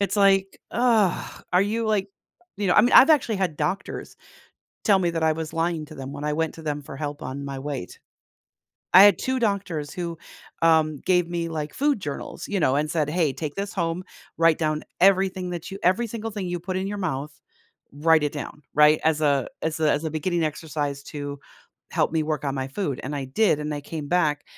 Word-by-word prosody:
It's 200 +1 0
like, 195 -1 +3
ugh, 230 -6 +1
"Are 180 - +5
you 225 +3 -1
like" 205 -2 +1 0.5
you 205 - -2
know, 180 - +3
I - - +8
mean, 240 +4 +2
I've 275 - +9
actually 255 -8 +3
had 185 -5 -1
doctors 165 +7 -3 0.7
tell 200 -2 +4
me 175 -2 +1
that 165 -1 -2
I 160 - +4
was 160 0 -5
lying 165 -1 -1
to 155 +1 -12
them 135 0 -7
when 145 +1 -5
I 150 - 0
went 160 +1 -1
to 165 - -10
them 150 -2 -3
for 135 - -10
help 145 0 -5
on 140 +2 -5
my 135 -1 -5
weight. 135 -8 -5 1.0
I 185 - +11
had 205 -4 +6
2 260 0 -1
doctors 190 -10 -1
who, 170 -2 -5 0.4
um, 160 -2 +4
gave 180 -2 +3
me, 170 -1 -2
like, 155 -2 -4
food 285 -4 +1
journals, 145 -6 -6
you 205 - -1
know, 135 -3 +3
and 150 +1 0
said, 155 -3 0
"Hey. 160 -4 +1
Take 150 0 -5
this 200 0 -3
home. 170 0 -2 0.3
Write 165 -1 +5
down 155 -1 -1 0.2
everything 190 -1 +3
that 175 +1 -6
you 195 - -6
every 190 +7 +2
single 225 0 -5
thing 200 -3 -4
you 175 - -2
put 185 +2 -4
in 190 - -2
your 205 0 -4
mouth. 150 -5 -3 0.6
Write 160 +2 +3
it 145 - -1
down," 150 0 -7
right? 150 +1 +6
As 155 -1 +2
a 140 -3 +2
as 160 0 -2
a 155 -1 +3
as 155 - -1
a 160 - -2
beginning 165 +2 -1
exercise 150 -2 -3
to 145 -1 -6 0.5
help - - +1
me 160 - +1
work 150 -2 -2
on 135 - -1
my 135 0 -3
food, 140 -3 -3
and 145 - -4
I 135 -2 -4
did, 150 +4 +2
and 150 0 -3
I 145 - -4
came 150 -1 -6
back 155 -4 +1
160 Hz, 220 wpm, -24 LUFS, 150-190 Hz, 1.0 s, I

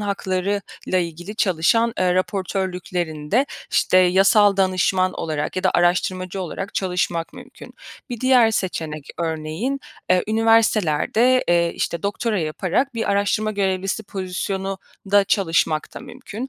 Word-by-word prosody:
hakları 200 -1 -1 0.3
ile 185 -1 +1
ilgili 175 +5 -8
çalışan, 220 +6 +2
eee, 180 -1 +2
raportörlüklerinde, 185 - -1 0.2
işte, 185 - +3
yasal 195 +3 +5
danışman 185 0 +2
olarak 155 +1 -3
ya 185 - -2
da - - +4
araştırmacı 185 +1 +1
olarak 190 +3 -6
çalışmak 180 -3 -1
mümkün. - - -13 0.4
Bir 240 - -5
diğer 255 -3 +5
seçenek 160 -8 -3
örneğin, 165 - -3 0.3
eee, 185 -1 +4
üniversitelerde, 225 +1 +3
eee, 170 -1 +3
işte, 170 - -3
doktora 205 +3 -2
yaparak 185 - -1
bir 225 -3 -1
araştırma 205 +2 +1
görevlisi 195 0 -1
pozisyonunda 195 +1 -2
çalışmak 165 -5 0
da - - -7
mümkün. 255 0 -8
190 Hz, 120 wpm, -21 LUFS, 175-210 Hz, 0.4 s, yasal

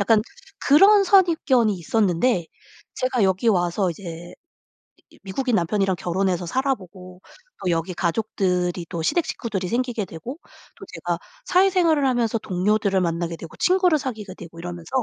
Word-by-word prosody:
약간 215 +2 +4 0.5
그런 395 +8 +7
선입견이 325 - +3
있었는데 185 +1 +1 0.5
제가 255 -2 0
여기 190 +4 +1
와서 180 -1 +1
이제 170 0 -9 0.8
이 - - -20
미국인 235 +5 -1
남편이랑 195 +1 0
결혼해서 180 0 -1
살아보고 185 -7 -3 0.4
또 185 - 0
여기 170 +2 -1
가족들이 180 -2 -1
또 170 -2 -4
시댁 335 - +1
식구들이 195 -6 -4
생기게 235 -2 -1
되고 235 - -8 0.4
또 - - -11
제가 - - -3 0.3
사회생활을 360 - +3
하면서 235 -3 +1
동료들을 200 0 0
만나게 170 -1 -2
되고 165 -1 -11
친구를 365 -3 +3
사귀게 220 -8 -6
되고 165 -2 -12
이러면서 175 -1 -7
195 Hz, 345 characters per minute, -23 LUFS, 175-255 Hz, 0.8 s, 그런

